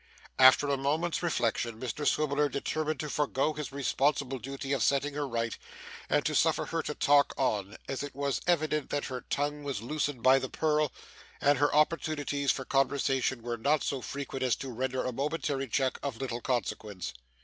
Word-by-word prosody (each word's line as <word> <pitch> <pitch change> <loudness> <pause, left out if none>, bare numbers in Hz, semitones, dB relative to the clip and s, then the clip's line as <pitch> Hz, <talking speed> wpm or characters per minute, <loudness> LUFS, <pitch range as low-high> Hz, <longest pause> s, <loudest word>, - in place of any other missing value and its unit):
After 130 +2 +7
a 140 -1 +1
moment's 155 +5 0
reflection, 120 -8 0
Mr 130 +4 -3
Swiveller 150 -1 +2
determined 155 +3 -2
to 155 - -3
forego 150 0 0
his 150 -3 -5
responsible 140 -1 0
duty 135 +2 -4
of 135 - 0
setting 140 +4 +2
her 145 0 -2
right, 115 -2 -2 0.5
and - - +2
to - - +1
suffer - - +2
her - - -2
to - - -4
talk 145 0 +4
on; 105 -6 -1
as 135 - -3
it 145 -2 -6
was 140 -1 -1
evident 155 -4 +1
that 145 - -1
her 130 -2 -5
tongue 145 +1 -2
was 135 -7 -3
loosened 145 -1 -2
by 130 +1 +6
the 130 - -4
purl, 150 -3 +1 0.5
and 145 -1 +3
her 145 +1 +3
opportunities 150 -2 +1
for 135 - +1
conversation 135 -2 +1
were 120 0 -3
not 140 +5 +2
so 135 -2 -2
frequent 135 0 -5
as 130 -2 +2
to 135 - -6
render 130 +2 -2
a 130 - -1
momentary 140 0 -2
check 130 +2 0
of 140 -5 -3
little 120 -1 -4
consequence. 105 -6 -3
140 Hz, 180 wpm, -30 LUFS, 130-145 Hz, 0.5 s, After